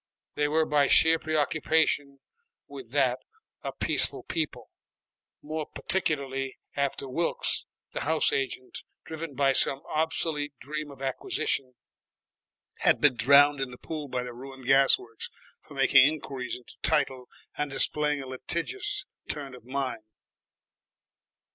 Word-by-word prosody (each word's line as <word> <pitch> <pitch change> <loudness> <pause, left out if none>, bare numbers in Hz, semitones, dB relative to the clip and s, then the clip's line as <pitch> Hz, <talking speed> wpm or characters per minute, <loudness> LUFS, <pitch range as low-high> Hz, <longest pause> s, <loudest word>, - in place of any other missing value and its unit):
They 145 - +1
were 160 +2 +2
by 145 -2 +3
sheer 160 0 +5
preoccupation 155 -2 +1 0.5
with 390 - -10
that - - +2 0.4
a - - -4
peaceful - - +2
people, 150 -8 -4 0.7
more 155 0 -4
particularly 135 -7 -1 0.2
after 140 -1 -1
Wilkes, 165 +6 -1 0.3
the - - -4
house 160 +1 +1
agent, 130 -2 -3 0.3
driven 160 -2 -6
by 135 0 +3
some 135 +1 +3
obsolete 155 -2 -1
dream 150 +3 -5
of 135 -1 -10
acquisition, 135 0 -2 1.0
had - - +4
been 145 -4 +4
drowned 140 +3 +6
in 135 - -1
the 125 - -11
pool 155 0 -6
by 125 -1 -2
the 125 -1 -7
ruined 130 +1 -10
gas 135 +1 +6
works 115 -2 -9 0.3
for - - -15
making - - +6
inquiries 135 -4 -4
into 125 - -16
title 130 -5 0 0.3
and 150 0 -2
displaying 145 +1 +1
a - - -9
litigious 260 - -2 0.2
turn 140 -3 -5
of 125 -2 -13
mind. 130 -3 -3
140 Hz, 130 wpm, -28 LUFS, 130-155 Hz, 1.0 s, drowned